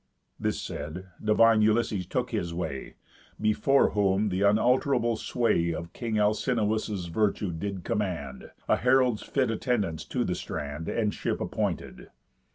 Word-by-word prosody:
This - - -1
said, 85 +6 -6
divine 110 +1 +5
Ulysses 105 -4 +1
took 125 +4 -2
his 85 -7 -2
way; 70 -6 -5 0.4
Before 110 +6 +3
whom 100 0 +2
the 95 0 -1
unalterable 120 +3 +3
sway 110 -7 +1
Of 85 +1 -7
king 115 -3 -3
Alcinous' 105 -2 0
virtue 100 +2 0
did 95 +2 -4
command 90 - -3 0.2
A - - +3
herald's 125 -3 +3
fit 130 -4 0
attendance 105 -9 -1
to - - -1
the - - -1
strand, 75 +2 -5
And 105 -3 0
ship - - -2
appointed. - - -3
105 Hz, 135 wpm, -28 LUFS, 90-115 Hz, 0.4 s, divine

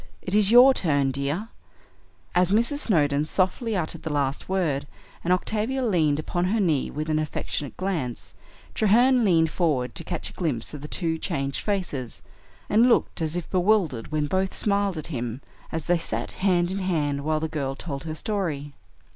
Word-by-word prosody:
It 185 - -4
is 205 -1 +4
your 250 +3 +8
turn, 145 - +2
dear." 140 - -2 0.8
As 180 +1 +3
Mrs. 235 +7 +2
Snowdon 150 - +2
softly 190 +7 0
uttered 165 -3 -3
the 160 - -4
last 140 +1 -1
word, 160 -8 0 0.4
and 175 - 0
Octavia 220 +8 0
leaned 160 -9 +2
upon 175 +3 -1
her 215 +5 +1
knee 160 -9 +1
with 155 +2 -4
an 155 -1 +1
affectionate 150 -1 -4
glance, 165 -11 -3 0.4
Treherne 240 +4 +4
leaned 165 -5 +3
forward 140 -9 0
to - - -5
catch 170 0 -4
a - - -16
glimpse 150 -10 -2
of 150 - -7
the 150 - -6
two 160 -1 -1
changed 140 -2 -2
faces, 175 - -3 0.4
and 230 +4 +4
looked 230 - +1
as 160 0 -1
if 175 -2 -3
bewildered 180 - +1
when 155 -1 0
both 190 +5 -1
smiled 200 -3 +1
at 155 - -4
him, 120 -1 -3 0.3
as 160 -2 -3
they 175 -1 +2
sat 115 -7 -3
hand 180 -2 +1
in 195 - -2
hand 150 -7 -1
while 155 +1 0
the 160 - -2
girl 140 -4 -3
told 140 -1 -6
her 155 -1 -4
story. 155 -7 -3
165 Hz, 180 wpm, -25 LUFS, 145-195 Hz, 0.8 s, your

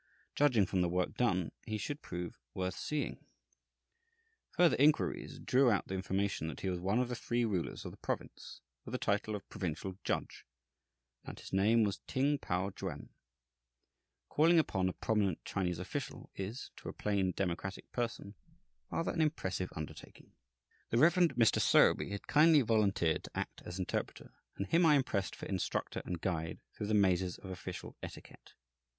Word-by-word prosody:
Judging 125 -9 +4
from 95 0 0
the 90 - +2
work 90 +1 0
done, 95 -8 +1 0.2
he 110 -1 -1
should 145 +8 -4
prove 90 -1 -6 0.2
worth 95 0 -1
seeing. 150 +8 -3 1.3
Further 175 -1 +4
inquiries 150 +3 +2
drew 130 0 +3
out 105 -4 +1
the - - -3
information 95 -2 -1
that 80 - -6
he 95 - 0
was 90 - -2
one 95 +5 +1
of 125 0 +2
the 125 - -4
three 120 0 0
rulers 95 -6 -2
of - - -5
the - - -13
province, - - -5 0.2
with - - -9
the - - +1
title 105 +1 0
of 100 - -8
provincial 95 0 -4
judge, - - -2 0.8
and - - -8
that - - -11
his - - -11
name 110 +4 +4
was 100 -2 -1
Ting 140 +2 +1
Pao 90 +3 -1
Chuen. - - -6 1.2
Calling 165 +3 +4
upon 95 - +2
a - - -4
prominent 100 -6 0
Chinese 90 -3 -1
official 125 +9 -5
is, 100 +7 -5
to - - -7
a - - -6
plain, 100 -3 0
democratic 95 +1 -3
person, 115 -4 -3 0.6
rather 165 - -1
an 165 - 0
impressive 95 - -1
undertaking. 80 -2 -9 0.6
The 115 - +1
Rev. 155 +6 +6
Mr. 140 - +4
Sowerby - - +5
had 100 0 -5
kindly 155 0 +6
volunteered 100 -8 +2
to - - -10
act - - -4
as 90 +1 -6
interpreter, 95 - -3 0.2
and 100 - -2
him 165 - +3
I 155 -3 +7
impressed 115 -8 0
for - - -8
instructor 95 -2 -2
and 90 -1 -3
guide 80 -3 -2
through 105 - -4
the 105 - +2
mazes 95 -3 +2
of 95 - -9
official 90 0 -7
etiquette. - - -11
100 Hz, 170 wpm, -34 LUFS, 90-125 Hz, 1.3 s, I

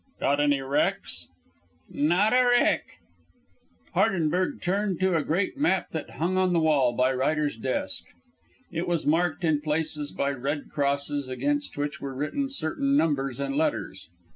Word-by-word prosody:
"Got 140 +1 +1
any 145 -1 +2
wrecks?" 135 +1 -1 0.6
"Not 175 +9 +2
a 255 0 +5
wreck." 245 0 +2 1.0
Hardenberg 180 0 +1
turned 195 0 -1
to 190 -2 +3
a 160 - +2
great 185 - -1
map 190 -11 +1
that 160 - -4
hung 180 +4 0
on 185 -1 +2
the 170 - +3
wall 150 -6 +3
by 130 +1 +2
Ryder's 145 +2 0
desk. 115 -5 -2 0.7
It 170 0 -3
was 170 -2 0
marked 165 +2 +1
in 155 -3 +2
places 150 -1 -1
by 140 - -1
red 140 +2 -4
crosses, 140 -1 -1
against 290 - -2
which 145 0 -3
were 135 -1 -5
written 270 - -2
certain 275 - 0
numbers 135 - 0
and 140 0 -2
letters. 95 - -2
155 Hz, 150 wpm, -26 LUFS, 140-180 Hz, 1.0 s, a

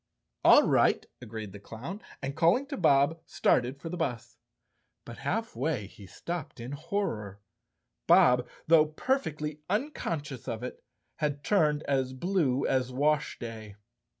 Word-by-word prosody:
"All - - +8
right," - - +3 0.2
agreed 110 -2 -7
the 100 - -10
clown 130 - -8 0.2
and, 135 +1 -3
calling 175 +12 +3
to 285 - -3
Bob, 155 -1 +3
started 125 +3 +1
for 165 - -7
the 180 - -4
bus. 125 -9 -3 0.7
But - - -9
half 225 - -2
way 130 -3 -1
he 100 0 -13
stopped 170 - -6
in 120 +3 -6
horror. 140 - -3 0.7
Bob, 125 -1 +5 0.2
though 155 -1 +6
perfectly 155 - -2
unconscious 165 - -3
of 115 +1 -4
it, 125 - -7 0.3
had 145 -2 -2
turned 155 -7 +2
as 130 -2 0
blue 140 -3 +1
as 130 -1 +1
washday. 120 -7 -1
145 Hz, 135 wpm, -29 LUFS, 125-165 Hz, 0.7 s, All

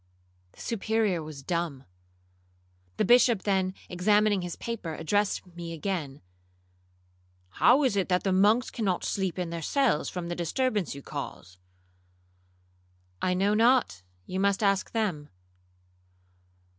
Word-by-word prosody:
The - - -14
Superior 220 -5 0
was 150 -3 -9
dumb. 170 -4 -2 1.1
The - - +2
Bishop 240 -2 +5
then 190 -2 0
examining 205 +2 +2
his 175 -1 -5
paper, 210 -9 -5
addressed 205 +7 0
me 170 -1 -6
again, 160 -5 -4 1.3
'How 255 - +4
is 255 -6 +2
it 195 -2 0
that 180 0 +1
the 195 - +1
monks 210 +6 +3
cannot 195 -7 -1
sleep 190 -3 -2
in 180 -2 -3
their 170 -1 -4
cells 255 - +1
from 180 -2 -5
the 175 - -3
disturbance 205 - -1
you 140 - -9
cause?'—'I 90 - -9
know 200 +3 +2
not—you 185 - +1
must 200 +1 +1
ask 195 -1 +2
them.' 185 -10 -2
180 Hz, 120 wpm, -28 LUFS, 140-205 Hz, 1.3 s, Bishop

